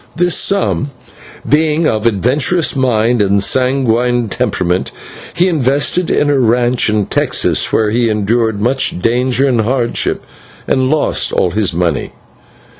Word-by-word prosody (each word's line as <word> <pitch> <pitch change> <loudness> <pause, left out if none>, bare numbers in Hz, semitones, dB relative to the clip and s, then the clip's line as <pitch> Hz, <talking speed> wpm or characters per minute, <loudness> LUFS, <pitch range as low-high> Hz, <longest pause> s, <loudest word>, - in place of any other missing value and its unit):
This 175 0 +1
sum, 195 -7 0 0.6
being 155 +1 +1
of 110 -2 0
adventurous 130 - +1
mind 120 -3 +1
and 100 0 +1
sanguine 125 -1 0
temperament, 90 -1 -2 0.4
he 175 +2 +2
invested 145 +2 0
in 150 - +1
a 140 - +1
ranch 120 0 +1
in 105 -1 0
Texas, - - 0
where 110 -1 +1
he 120 +1 +1
endured 110 +1 -1
much 125 -3 0
danger 125 +5 +1
and 120 -4 +1
hardship, 120 +1 -1 0.4
and 130 0 +1
lost 155 0 0
all - - 0
his 105 -2 0
money. 85 -4 -2
120 Hz, 130 wpm, -14 LUFS, 110-140 Hz, 0.6 s, he